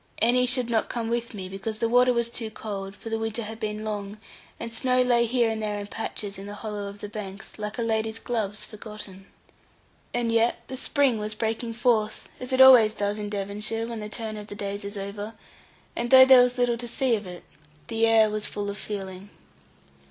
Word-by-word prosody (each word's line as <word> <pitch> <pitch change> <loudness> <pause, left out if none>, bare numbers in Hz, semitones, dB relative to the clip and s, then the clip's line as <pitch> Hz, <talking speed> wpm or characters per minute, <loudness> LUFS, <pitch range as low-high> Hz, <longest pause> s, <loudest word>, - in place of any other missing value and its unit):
Annie 250 +2 +3
should 250 -1 +2
not 230 -2 0
come 230 -2 -2
with 235 -1 -2
me, 190 -2 -5
because 195 +3 -5
the 230 +1 +1
water 250 +2 +5
was 235 -1 0
too 230 -2 -4
cold; 200 -3 -6
for 225 - -9
the 225 - 0
winter 225 +1 -3
had 220 +1 -7
been 215 -1 -3
long, 205 -1 -4 0.4
and 230 0 -6
snow 255 +2 +1
lay 240 -1 +3
here 235 -1 +2
and 220 0 -3
there 210 -1 -2
in 205 - -5
patches 205 -2 -4
in 195 - -8
the 205 - -7
hollow 210 -1 -5
of 200 +1 -10
the 210 - -5
banks, 205 0 -8
like 210 +2 -4
a 235 - -1
lady's 220 0 0
gloves 215 -3 -3
forgotten. 210 -3 -10 0.8
And 240 -1 0
yet 230 +1 +3
the 260 - -4
spring 270 -3 +1
was 210 0 -3
breaking 225 +1 -2
forth, 225 -3 0
as 255 +1 -4
it 260 0 +4
always 240 -5 +8
does 205 +1 -1
in 205 -1 -4
Devonshire, 210 +3 -3
when 230 -1 -5
the 210 0 -6
turn 215 0 -4
of 210 0 -8
the 205 - -7
days 200 0 -4
is 200 +1 -6
over; 205 +2 -5 0.6
and 240 0 -2
though 260 0 +10
there 260 -1 +9
was 250 0 +2
little 245 -1 +2
to 240 +1 -3
see 245 0 +2
of 205 -3 -5
it, 180 -1 -8 0.4
the 225 0 +2
air 220 -1 +5
was 215 0 0
full 205 -1 -3
of 200 - -7
feeling. 195 -1 -6
220 Hz, 220 wpm, -26 LUFS, 205-235 Hz, 0.8 s, though